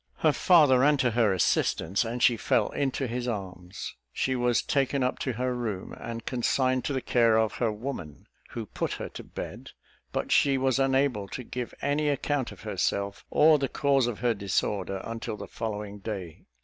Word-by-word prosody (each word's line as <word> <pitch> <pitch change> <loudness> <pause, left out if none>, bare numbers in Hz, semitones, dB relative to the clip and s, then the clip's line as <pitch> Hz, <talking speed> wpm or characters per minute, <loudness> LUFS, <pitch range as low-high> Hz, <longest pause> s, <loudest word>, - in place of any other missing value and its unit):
Her 155 - +4
father 150 -6 +5
ran 145 +3 +4
to 125 -2 +2
her 110 -2 +3
assistance, 95 +2 +1
and 120 +1 -3
she 120 - +6
fell - - +1
into 135 -1 -1
his 120 0 -3
arms. 95 -5 -5 0.2
She 130 - 0
was 120 -1 +2
taken 135 -1 +1
up 125 - -1
to 130 - -2
her 125 +2 -1
room, 110 -6 -4
and 115 0 -6
consigned 130 +1 +1
to 145 - -1
the 130 - -1
care 115 -2 +4
of 110 -1 +2
her 115 -3 +1
woman, 105 - -6 0.2
who 115 -2 -5
put - - -3
her - - -5
to - - -9
bed; - - -8 0.4
but - - -2
she 140 -2 +4
was 130 0 +1
unable 135 -6 +2
to 125 - -6
give 125 0 -5
any 145 +1 +1
account 145 -1 -1
of - - -12
herself, 100 0 -2
or 155 0 +5
the 135 -2 -1
cause 135 -3 +2
of 120 -4 -4
her 120 -1 +3
disorder, 95 -1 -1
until 115 -1 -5
the - - -6
following 105 -2 -5
day. 95 -6 -6
120 Hz, 190 wpm, -28 LUFS, 105-135 Hz, 0.4 s, she